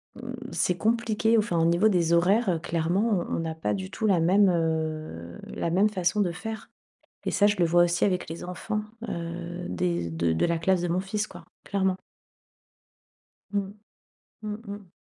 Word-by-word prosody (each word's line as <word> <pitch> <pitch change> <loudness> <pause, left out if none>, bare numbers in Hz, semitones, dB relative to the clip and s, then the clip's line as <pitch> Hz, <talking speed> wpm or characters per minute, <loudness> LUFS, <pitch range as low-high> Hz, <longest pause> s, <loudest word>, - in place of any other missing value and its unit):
mmh 245 0 -7 0.2
c'est 180 - +1
compliqué 225 +2 +2
au, - - +6
enfin, 210 -5 0
au 165 - +3
niveau 170 +6 +4
des 170 -4 +2
horaires, 195 +7 +4
heu, 170 -3 +1
clairement 175 +5 0
on - - -2
on - - -4
a 160 0 -3
pas 105 -10 -1
du 95 -2 -4
tout - - -3
la 195 -5 +4
même, 190 +4 +5
heu, 155 - -2
la - - -3
même 195 +5 +4
façon 205 +1 +1
de 180 -4 +1
faire 220 +6 -6 0.6
et - - +1
ça 205 - +3
je 205 - +2
le 175 - +3
vois 175 +1 +5
aussi 175 0 +1
avec 185 -2 0
les 165 - -6
enfants, 195 +4 -3 0.3
heu, 170 +1 -5
des 85 -1 -1
de 80 0 0
de 80 - +2
la 170 -1 +1
classe 180 +2 +2
de 175 - -1
mon 175 +2 +1
fils 205 +3 -2
quoi - - -12 0.2
clairement. 190 -2 0 1.5
Mmh, 200 -1 -2 0.7
mmh 210 -1 -4
mh. 200 -2 -8
175 Hz, 190 wpm, -27 LUFS, 165-205 Hz, 1.5 s, au